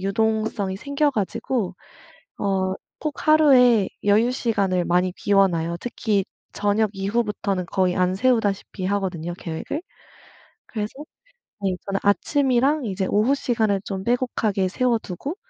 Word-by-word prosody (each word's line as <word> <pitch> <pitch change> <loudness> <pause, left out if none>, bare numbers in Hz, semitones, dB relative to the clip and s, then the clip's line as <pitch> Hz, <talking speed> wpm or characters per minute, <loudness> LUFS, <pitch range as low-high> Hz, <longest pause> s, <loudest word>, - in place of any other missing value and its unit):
유동성이 215 0 0
생겨 280 +6 0
가지고 210 -2 -2 0.7
어 190 -1 0 0.2
꼭 305 0 -5
하루에 255 -9 +6 0.2
여유 215 +4 +4
시간을 200 -8 0
많이 180 +1 +2
비워 195 -1 +4
놔요. 170 -1 -2
특히 220 -4 0 0.3
저녁 205 +1 +1
이후부터는 200 -2 -1
거의 185 0 0
안 180 0 +1
세우다시피 205 -4 0
하거든요 185 -4 -2
계획을. 170 - -5 0.9
그래서 210 -3 -3 0.7
네 190 -2 0
저는 195 0 -1
아침이랑 270 +6 +2
이제 190 -2 -2
오후 220 +7 +3
시간을 220 -7 0
좀 190 -1 -4
빼곡하게 225 -4 0
세워두고 240 - -2
205 Hz, 290 characters per minute, -23 LUFS, 190-240 Hz, 0.9 s, 하루에